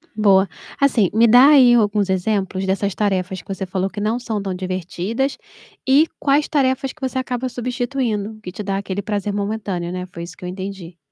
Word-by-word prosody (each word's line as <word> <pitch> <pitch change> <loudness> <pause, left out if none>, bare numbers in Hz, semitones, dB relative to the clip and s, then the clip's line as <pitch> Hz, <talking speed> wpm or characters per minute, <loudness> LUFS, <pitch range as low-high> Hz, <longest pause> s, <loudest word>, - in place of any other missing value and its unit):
Boa. 200 -2 +4 0.3
Assim, 245 -9 +3
me 225 +2 +4
dá 245 +4 +8
aí 260 -5 +7
alguns 210 -3 +2
exemplos 190 0 -1
dessas 195 +1 0
tarefas 190 -2 -1
que - - -30
você 195 0 -4
falou 190 +1 -2
que 205 - -7
não 215 +4 0
são 225 -4 -3
tão 195 -1 -3
divertidas, 185 - -3 0.5
e 295 +4 +6
quais 285 +1 +2
tarefas 265 -2 0
que 310 - -26
você 260 0 -2
acaba 255 0 -2
substituindo, 245 -4 -3
que 180 - -6
te 190 - -7
dá 195 -1 -2
aquele 195 0 -3
prazer 205 0 -2
momentâneo, 200 -4 -3
né. 180 0 -4
Foi 180 -2 -10
isso 170 +1 -10
que - - -9
eu - - -4
entendi. 185 -2 -7
205 Hz, 195 wpm, -20 LUFS, 190-245 Hz, 0.5 s, dá